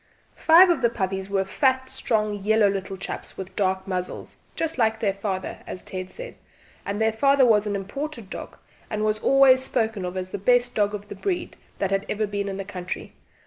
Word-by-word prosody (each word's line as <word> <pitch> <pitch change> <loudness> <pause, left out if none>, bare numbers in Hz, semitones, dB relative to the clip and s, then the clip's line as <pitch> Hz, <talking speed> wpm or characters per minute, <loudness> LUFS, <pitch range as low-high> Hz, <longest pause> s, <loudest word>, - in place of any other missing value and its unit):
Five 350 +3 +7
of 310 -6 0
the 235 - +4
puppies 190 -3 -3
were 195 -1 +1
fat 260 +5 +1
strong 220 -5 0
yellow 215 +1 +3
little 195 -1 -3
chaps - - -7
with 190 -1 -7
dark 190 -1 0
muzzles 185 -1 -4 0.2
just 325 -3 -2
like 220 -1 +2
their 205 -4 +1
father, 195 -1 -4
as 185 - -7
Ted 185 -1 -6
said; - - -8 0.5
and 200 +1 -2
their 220 0 +3
father 275 +3 +4
was 215 -3 +4
an 205 - -1
imported 230 +4 -5
dog, - - -7 0.3
and 215 0 -1
was 215 0 +1
always 265 +1 +6
spoken 225 -6 -1
of 180 +1 -4
as 185 0 -4
the 205 - -5
best 245 +4 +3
dog 210 -1 +1
of 205 0 -8
the - - -7
breed 360 -3 -3 0.2
that 195 -1 -1
had 195 0 0
ever 215 +1 0
been 200 -1 -3
in 195 - -4
the 195 - -5
country. 180 -2 -6
210 Hz, 205 wpm, -24 LUFS, 195-250 Hz, 0.5 s, Five